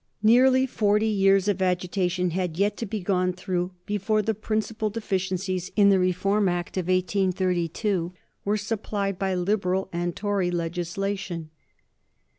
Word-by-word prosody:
Nearly 255 +4 +5
forty 210 -3 +1
years 195 -2 +3
of 200 -2 0
agitation 180 0 0
had 180 -2 -2
yet 205 +2 +1
to 230 - -4
be 215 0 -3
gone 180 -1 +1
through 180 0 -3
before 210 +1 0
the 220 - 0
principal 215 +1 -2
deficiencies 185 -3 -2
in 205 -2 +6
the 195 -1 +5
Reform 185 +2 +2
Act 175 0 -3
of 185 -2 -2
1833 185 0 0 0.3
were 205 +1 +1
supplied 205 -2 -3
by 190 -1 0
Liberal 190 0 0
and 175 0 -2
Tory 200 -3 0
legislation. 175 0 -3
190 Hz, 135 wpm, -25 LUFS, 180-205 Hz, 0.3 s, in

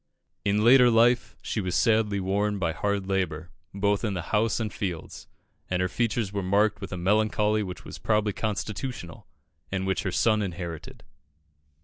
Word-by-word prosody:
In 105 +1 +1
later 125 +1 +7
life 120 +2 +3
she 110 - -2
was 90 -2 -2
sadly 110 -3 +2
worn 100 +2 0
by 85 -4 0
hard 100 +2 -1
labour, 90 -4 -2 0.2
both 100 +1 0
in 105 -4 -1
the 85 - -3
house 110 +2 +2
and 110 -2 -3
fields, 90 -5 -5 0.4
and 90 - 0
her 90 - +1
features 110 0 -1
were 100 - -1
marked 100 +3 +2
with 95 - -6
a 90 - -4
melancholy 105 +3 +2
which 90 -3 -6
was - - -9
probably 105 -2 +1
constitutional, 105 - -4 0.4
and 95 -1 -2
which 95 0 0
her 95 - -2
son 110 +3 +2
inherited. 85 -4 -6
100 Hz, 165 wpm, -26 LUFS, 95-110 Hz, 0.4 s, later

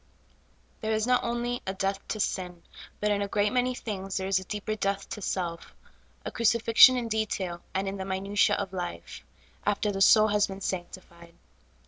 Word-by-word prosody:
THERE 220 0 -1
is 215 0 +1
not 250 0 +2
only 240 +1 -2
a 190 - -2
death 195 0 -1
to 215 - -3
sin, 180 -4 -3 0.4
but 210 0 +1
in 205 0 +1
a 200 - -1
great 205 +2 0
many 250 0 +1
things 195 -5 -4
there 190 - -2
is 195 -1 +2
a - - -8
deeper 210 +3 -4
death 200 -1 -2
to 210 - -6
self 175 -3 -4 0.2
— - - -35
a - - -4
crucifixion 230 +2 +6
in 240 -2 -2
detail, 200 -5 -2
and 195 +1 0
in 195 +1 -3
the 190 - -5
minutia 195 +2 +1
of 200 -2 -4
life 175 - -6 0.2
— - - -30
after 205 0 0
the 195 -1 -4
soul 215 +2 +6
has 210 0 +2
been 195 0 -8
sanctified. 175 -2 -6
200 Hz, 195 wpm, -28 LUFS, 190-215 Hz, 0.4 s, crucifixion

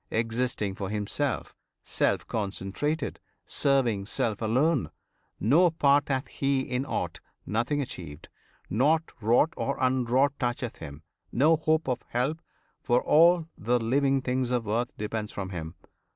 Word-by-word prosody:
Existing 115 -2 -1
for 95 0 -5
himself, 110 +6 -2 0.3
Self - - 0
concentrated, 110 +9 -3 0.3
serving 120 -8 +1
self 110 -1 -1
alone, 130 +7 +2 0.5
No 155 - +5
part 145 -3 +3
hath 135 0 -1
he 135 -1 0
in 130 +1 -3
aught; - - -3 0.3
nothing 120 +7 0
achieved, 85 - -7 0.4
Nought 150 - +2
wrought 120 +9 +3
or 140 - -2
unwrought 130 +2 +2
toucheth 120 -1 -2
him; 75 -1 -9 0.3
no 155 +6 +4
hope 155 0 +1
Of 125 -2 -1
help 135 +7 -1 0.4
for 120 0 +2
all 170 +2 +5
the 120 +3 +1
living 135 +3 +1
things 125 -1 0
of 120 -3 -1
earth 120 +3 0
Depends 105 0 -3
from 95 -1 -5
him. 80 -2 -6
125 Hz, 135 wpm, -27 LUFS, 110-140 Hz, 0.5 s, No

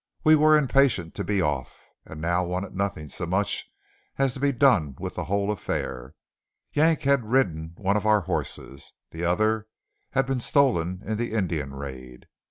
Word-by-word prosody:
We 155 0 +7
were 155 0 +6
impatient 135 - +2
to - - -4
be 100 -3 0
off, 75 -5 -2 0.3
and 80 - -10
now 85 +3 +1
wanted 90 +2 -4
nothing 95 -6 -2
so 85 +4 -5
much 95 +4 0 0.5
as 135 -2 +2
to 130 - -7
be 140 +1 +2
done 115 - +3
with - - -5
the - - -4
whole 100 +1 0
affair. 65 -9 -4 0.6
Yank 155 +1 +3
had 140 -2 +3
ridden 85 -11 0
one 100 0 0
of 105 +1 -2
our 105 -1 +4
horses; 70 -5 -5 0.2
the 80 +1 -6
other 110 +5 +1 0.5
had 135 -1 +2
been 135 0 -1
stolen 100 - +1
in 110 0 -2
the 120 -1 -2
Indian 80 -10 -2
raid. 65 -3 -9
100 Hz, 175 wpm, -25 LUFS, 80-130 Hz, 0.6 s, We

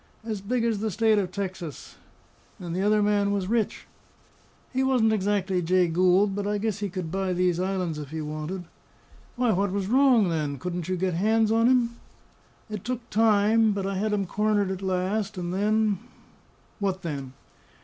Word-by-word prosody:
"As 220 -3 -4
big 235 +4 -1
as 225 -3 0
the 220 +1 -1
State 220 +2 +3
of 185 -3 -2
Texas." 185 -6 -6 0.6
"And 175 -2 -5
the 185 - -1
other 210 +1 +3
man 205 -1 +2
was 200 -2 -1
rich?" 225 0 -1 0.9
"He 260 - +1
wasn't 250 -5 +3
exactly 195 -2 0
Jay 180 +1 +3
Gould, 185 +4 +3
but 200 0 -2
I 210 0 0
guess 210 -1 -2
he 205 -1 -2
could 180 -3 -5
buy 190 0 -1
these 180 -1 +1
islands 185 -4 -2
if 145 -2 -7
he 160 +1 -5
wanted." 155 +4 -5 0.7
"Why, 245 -2 +2
what 200 0 +1
was 200 0 -1
wrong, 245 -3 +4
then? 150 -4 -2
Couldn't 175 +3 -4
you 185 - 0
get 185 0 0
hands 220 +5 +2
on 230 +1 +4
him?" 240 -2 +2 0.7
"It 210 -3 -6
took 245 -1 -5
time, 220 0 +4
but 200 -1 -3
I 195 - -2
had 210 +3 -1
him 200 -2 0
cornered 205 0 +1
at 190 0 -4
last; 195 +2 -1
and 175 0 -3
then 210 0 +1 0.4
" - - -34
"What 190 -2 -2
then?" 140 -5 -5
200 Hz, 185 wpm, -26 LUFS, 180-215 Hz, 0.9 s, wrong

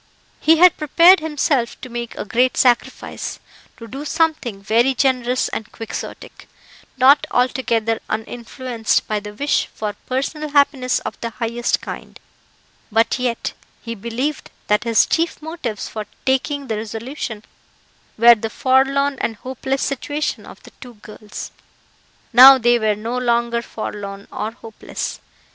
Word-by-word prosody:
He 320 +1 +5
had 360 +1 +6
prepared 335 +5 +6
himself 295 -5 -1
to - - -7
make 240 -1 -6
a - - -4
great 245 +5 +1
sacrifice 245 -2 0 0.4
to 230 - -10
do 270 +5 -7
something 305 -9 0
very 235 +5 +2
generous 255 -2 +1
and 220 - -6
Quixotic 225 - -8 0.5
not 270 +3 +5
altogether 235 -3 0
uninfluenced 235 +1 -2
by 215 -1 -1
the 210 0 -10
wish 285 +5 0
for 210 -1 -3
personal 300 +4 -2
happiness 280 -3 +2
of - - -7
the 230 - -2
highest 235 +1 -1
kind; - - -8 0.7
but 225 +4 +2
yet 245 -2 -2 0.3
he 230 - -5
believed 235 +7 -4 0.2
that 210 +3 +1
his 230 -1 +4
chief 330 +1 0
motives 305 - -5
for 215 -2 -6 0.2
taking 275 +2 0
the 220 -4 -3
resolution 225 0 -6 0.7
were 235 +2 +8
the 225 0 -4
forlorn 270 +2 +2
and 225 - -1
hopeless 265 +4 -3
situation 290 +2 -3
of - - -13
the - - -14
two 245 -2 -11
girls. 210 0 -9 0.8
Now 265 +3 +10
they 240 -1 +3
were 215 -1 +1
no 230 +4 -3
longer 235 -1 +1
forlorn 200 -3 -7
or 215 - -3
hopeless. 225 -2 -7
245 Hz, 140 wpm, -20 LUFS, 225-275 Hz, 0.8 s, Now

